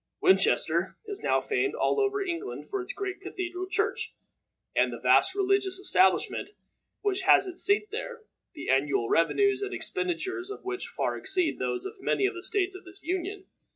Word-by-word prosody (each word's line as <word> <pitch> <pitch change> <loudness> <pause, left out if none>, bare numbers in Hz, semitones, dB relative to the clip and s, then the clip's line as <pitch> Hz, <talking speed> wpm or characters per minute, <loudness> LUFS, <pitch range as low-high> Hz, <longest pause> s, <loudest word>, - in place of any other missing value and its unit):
Winchester 375 - +3
is 410 -1 -5
now - - +2
famed 405 -2 -1
all - - +1
over 405 -1 +1
England 370 +1 -5
for 395 -1 -1
its 365 - -5
great 390 -1 -5
Cathedral 370 -1 -5
church, 435 +2 -1 0.6
and - - +3
the - - -5
vast 380 - +4
religious 390 -1 +1
establishment 190 - +2 0.5
which 390 -2 0
has 390 0 +6
its 365 -1 -4
seat 410 +1 +3
there 475 +1 -6 0.3
the 305 - -7
annual 135 -3 +2
revenues 400 - +3
and 400 -1 -3
expenditures 375 0 -2
of 410 - -8
which 380 0 -3
far - - -2
exceed 375 -4 0
those 375 0 -1
of 390 0 -8
many 395 - +1
of - - +1
the 350 - -7
states 390 -1 +1
of 375 - -10
this 365 +1 -13
Union. 375 +3 -3
385 Hz, 175 wpm, -28 LUFS, 365-405 Hz, 0.6 s, has